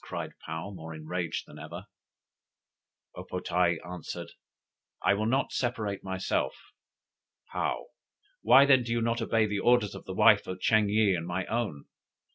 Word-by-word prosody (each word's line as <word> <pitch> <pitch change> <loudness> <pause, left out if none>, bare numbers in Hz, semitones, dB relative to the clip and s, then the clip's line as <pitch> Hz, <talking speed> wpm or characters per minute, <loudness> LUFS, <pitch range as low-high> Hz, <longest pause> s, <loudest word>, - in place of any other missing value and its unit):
cried - - -5 0.2
Paou, 80 +5 -4
more 80 -3 -8
enraged 80 +2 -3
than - - -13
ever. - - -8 1.3
O - - -7
po 90 - -5
tae 90 -1 +1
answered: 90 -2 -7 0.7
"I - - +4
will 105 +2 0
not 130 +4 +1
separate 110 -5 -2
myself." 95 -8 -1 1.0
Paou: - - -1 0.6
"Why 135 +1 +7
then 135 -2 +6
do 115 -1 -5
you 115 0 +1
not 115 +1 0
obey 115 -1 +2
the 105 -1 -2
orders 120 -2 +3
of - - -10
the 95 - -6
wife 105 -1 +5
of 95 0 -5
Ching 110 +1 +3
yih 105 -1 +3
and 85 -1 -4
my 90 +1 -2
own? 110 -11 -3
100 Hz, 160 wpm, -29 LUFS, 90-115 Hz, 1.3 s, Why